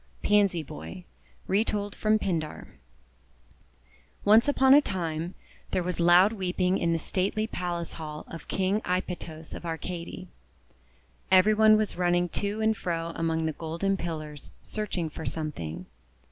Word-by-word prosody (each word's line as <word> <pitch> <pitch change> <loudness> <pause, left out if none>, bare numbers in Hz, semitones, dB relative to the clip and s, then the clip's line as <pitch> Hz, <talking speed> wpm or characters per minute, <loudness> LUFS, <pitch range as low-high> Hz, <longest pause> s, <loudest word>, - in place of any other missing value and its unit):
PANSY 200 -5 +3
BOY 175 +5 -9 0.4
Retold 205 0 0
from 215 0 +2
Pindar 165 -7 -3 1.6
ONCE 220 +5 +6
upon 265 -2 +5
a 290 - +8
time, 170 - -3 0.3
there 180 - 0
was 180 -1 -3
loud 175 +5 +6
weeping 185 -2 0
in 170 - +1
the 165 - +2
stately 195 +6 -1
palace 175 -5 -3
hall 150 -2 -7
of 165 - -9
King 195 +3 0
Aipytos 175 -3 -4
of - - -7
Ar 165 -1 -3
cady. 180 +2 -6 1.0
Every 190 +3 +6
one 215 0 +6
was 215 -4 -1
running 175 0 +2
to 205 +5 -2
and 220 0 +3
fro 170 -4 -3
among 165 -1 -1
the 160 - 0
golden 165 +6 -1
pillars, 155 -5 -6
searching 200 -6 -3
for 160 +1 -8
something. 150 - -4
180 Hz, 140 wpm, -28 LUFS, 165-205 Hz, 1.6 s, a